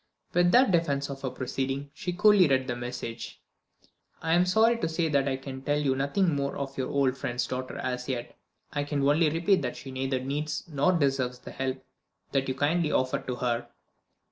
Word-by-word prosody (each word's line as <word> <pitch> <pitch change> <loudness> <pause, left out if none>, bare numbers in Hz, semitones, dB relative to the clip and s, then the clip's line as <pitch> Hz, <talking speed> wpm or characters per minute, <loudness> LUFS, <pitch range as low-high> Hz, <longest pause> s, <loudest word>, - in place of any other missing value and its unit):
With 175 0 +4
that 250 0 +6
defense 140 -5 +1
of 135 0 -7
her 135 - -2
proceeding, 135 +2 -3
she 180 - -4
coolly 200 0 +5
read 130 -2 +2
the 125 -2 -2
message: 120 -2 -6 0.8
"I 165 - 0
am 175 +2 +4
sorry 225 +5 +4
to 165 - -1
say 165 0 0
that 140 -2 +2
I 135 -1 0
can 135 0 -7
tell 145 +2 0
you 140 -3 +1
nothing 160 +6 +1
more 140 0 -1
of 140 -1 -4
your 130 -1 -2
old 135 -2 +2
friend's 120 -2 -2
daughter 130 0 -4
as 125 0 -3
yet. 120 -2 -4 0.4
I 145 - 0
can 145 -1 0
only 155 +2 +4
repeat 170 +5 +2
that 125 -3 -3
she 135 - -8
neither 130 0 -1
needs 145 +4 -3
nor 150 +3 +2
deserves 135 -6 +1
the - - -10
help 130 0 -3 0.5
that 135 -1 +1
you 130 - -1
kindly 150 +3 +1
offer 130 0 +1
to 125 - -4
her." 120 -1 -1
140 Hz, 200 wpm, -28 LUFS, 130-160 Hz, 0.8 s, that